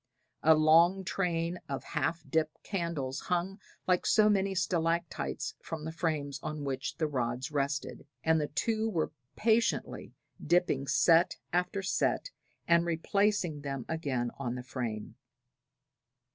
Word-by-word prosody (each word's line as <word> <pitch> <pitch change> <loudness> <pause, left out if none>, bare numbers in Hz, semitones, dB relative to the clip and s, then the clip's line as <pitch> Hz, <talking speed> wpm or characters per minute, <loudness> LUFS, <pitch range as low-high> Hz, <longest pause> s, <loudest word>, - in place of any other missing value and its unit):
A 160 +1 +6
long 165 +5 +5
train 175 -2 -1
of 135 - -3
half 160 0 -2
dipped 155 +2 -1
candles 170 -8 -2
hung 180 +3 -2 0.3
like 180 -1 +2
so 215 -1 +5
many 195 -1 +1
stalactites 165 - -1
from 155 -2 -6
the 160 - -3
frames 150 -4 -2
on 150 -1 -4
which 135 -1 -3
the 160 - +1
rods 130 0 -2
rested, 140 -1 -2 0.2
and 160 -1 +3
the 150 - -1
two 220 +8 0
were 165 -7 -1 0.2
patiently 230 +1 +1 0.3
dipping 160 -5 +2
set 170 +4 +4 0.2
after 180 +2 0
set 345 - 0 0.4
and 170 0 +5
replacing 175 -1 0
them 135 -3 -4
again 135 -7 -2
on 125 -3 -2
the 125 - -5
frame. 115 -4 -5
160 Hz, 130 wpm, -31 LUFS, 140-180 Hz, 0.4 s, A